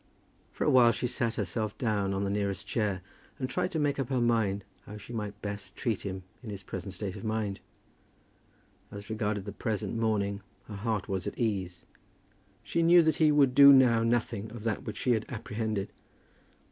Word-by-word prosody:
For - - -3
a - - +3
while 125 -2 +7
she 115 - -3
sat 120 -2 -1
herself 105 +2 -3
down 105 -5 0
on 100 0 -1
the 100 - -1
nearest 100 -2 -2
chair, 100 -5 -1 0.3
and 130 - -2
tried 180 +6 -1
to - - 0
make 145 -2 0
up 135 - -2
her 130 -2 +1
mind 110 -4 +1 0.2
how 105 - -8
she 105 +3 -10
might 105 -2 -4
best 100 -1 -6
treat 115 -6 -1
him 95 -2 -5 0.2
in 120 - -8
his 100 -1 -7
present 95 0 -6
state 95 0 -4
of - - -8
mind. 110 -3 -2 1.3
As 100 +1 -9
regarded 105 -2 -2
the 105 - -5
present 110 -1 -3
morning 105 -3 0 0.2
her 110 - -10
heart 105 0 -2
was 95 -3 -2
at - - -5
ease. 95 -6 -2 0.8
She 170 - 0
knew 170 +1 +7
that 160 0 +2
he 155 -2 +5
would 140 -3 +4
do 140 +1 +10
now 125 -4 +6
nothing 115 -2 0
of 110 -1 -9
that 115 -2 -2
which 105 -2 -5
she 125 - +1
had 110 -2 +1
apprehended. 110 -3 -3
110 Hz, 195 wpm, -29 LUFS, 100-120 Hz, 1.3 s, do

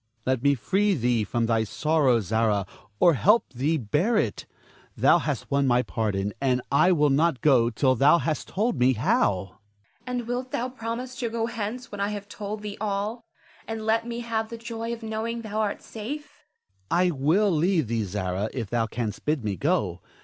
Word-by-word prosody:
Let 130 -2 +1
me 140 +1 +3
free 195 - +1
thee 120 -4 +1
from 115 +3 -1
thy 115 -1 +2
sorrow, 135 +1 +2
Zara, 105 0 +1 0.3
or 175 - +6
help 210 - +3
thee 145 +6 0
bear 150 - +1
it. 105 - -1 0.5
Thou - - +5
hast - - -3
won 140 0 +2
my 125 0 +3
pardon, 105 -4 -2
and 130 -2 +2
I 175 +6 +5
will 150 -4 +3
not 150 0 +2
go 125 -6 +4
till 130 +3 +2
thou 140 +7 +5
hast 160 -2 -2
told 220 +5 -1
me 125 +1 +4
how. 125 - +1
Zara. - - -27 0.5
And 245 -2 -3
wilt 250 +1 -3
thou 250 0 -2
promise 245 +1 -5
to 235 - -1
go 225 0 -1
hence 230 +2 -5
when 205 -1 -5
I 200 - +1
have 205 -1 -5
told 210 +1 -6
thee 205 -1 -6
all, 210 +3 -2 0.4
and 225 -1 -4
let 225 +1 +1
me 235 0 -4
have 225 -2 -2
the 230 - -6
joy 230 0 -5
of 235 -1 -6
knowing 225 +1 -3
thou 215 0 -3
art 210 -2 -1
safe? 280 +8 -8
Ernest. 95 -1 -45
I 180 +1 +3
will 165 +9 +2
leave 165 - +2
thee, 115 -1 -1
Zara, 95 +1 -2
if 115 -6 -4
thou 115 -1 +1
canst 110 -2 -4
bid 150 -4 0
me 105 -2 -1
go. 135 - 0
165 Hz, 195 wpm, -26 LUFS, -, 0.5 s, or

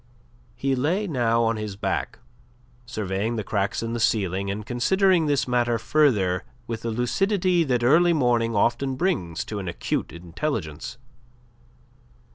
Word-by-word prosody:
He 135 0 0
lay 160 +11 0
now 120 - +1
on 115 0 +1
his 105 -2 -5
back, 100 - -2 0.7
surveying 110 -1 -2
the 110 - -2
cracks 100 +1 -1
in 115 0 -3
the 120 - -2
ceiling 100 -3 0
and 105 +1 -4
considering 175 - +2
this 145 -3 +1
matter 120 -1 +1
further 105 -10 +2 0.2
with 115 -2 -5
the 115 - -3
lucidity 180 - +1
that 125 -4 0
early 165 +8 +5
morning 120 -7 +2
often 130 +5 +1
brings 130 - -1
to 105 - -5
an 95 - -6
acute - - -2
intelligence. 85 - -4
120 Hz, 140 wpm, -24 LUFS, 100-145 Hz, 0.7 s, early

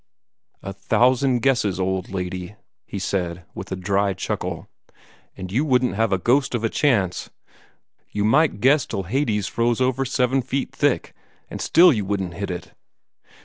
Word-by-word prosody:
"A 100 - -5
thousand 125 +4 +2
guesses, 110 -8 +1
old 95 0 -1
lady," 90 +1 -5 0.3
he - - -6
said, 90 -2 -3
with 95 - -8
a - - -1
dry 100 +2 0
chuckle, - - -4 0.7
"and 95 -1 -7
you 125 +9 +1
wouldn't 125 -4 +2
have 110 +1 0
a 95 - +3
ghost 125 +6 +1
of 115 - -2
a 115 - +1
chance. 105 - 0 0.8
You 105 0 -1
might 140 -1 +3
guess 140 +3 +4
till 95 - -3
Hades 105 -1 0
froze 115 +3 0
over 130 +1 +1
seven 130 0 +1
feet 135 +3 -3
thick, - - 0 0.4
and - - -5
still 175 -1 +6
you 105 -4 -1
wouldn't 95 -3 -2
hit 100 +2 -5
it." 90 -1 -6
105 Hz, 160 wpm, -22 LUFS, 95-130 Hz, 0.8 s, still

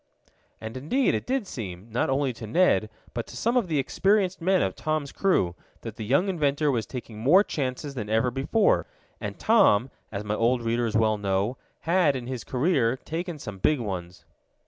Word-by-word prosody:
And 110 +2 -7
indeed 245 - +1
it - - -3
did 260 -3 0
seem, 100 - -7
not 120 - 0
only 135 -1 +1
to 115 -1 -8
Ned, 110 - +3 0.2
but 120 - -4
to - - -9
some 235 +2 0
of 240 -6 +2
the 160 -3 0
experienced 190 +6 +1
men 185 +2 +3
of 95 - -1
Tom's 155 -2 -2
crew, 175 - +1 0.3
that 115 -2 -7
the 110 - -6
young 140 - +2
inventor 150 -5 +1
was 115 -4 -1
taking 120 -4 -7
more 160 - +6
chances 140 -3 -3
than 110 -6 -5
ever 115 +3 +2
before, 140 - +2 0.3
and - - -5
Tom, 135 - +4 0.2
as 100 0 -4
my 105 0 -2
old 120 +2 +1
readers 115 -1 0
well 110 -1 +2
know, 100 +4 0 0.3
had, 165 -4 +3
in 125 -2 -4
his 125 -2 -5
career, 130 -3 +1
taken 165 +4 -5
some 105 -8 -8
big 150 +7 +2
ones. 90 -5 -6
130 Hz, 190 wpm, -26 LUFS, 110-165 Hz, 0.3 s, more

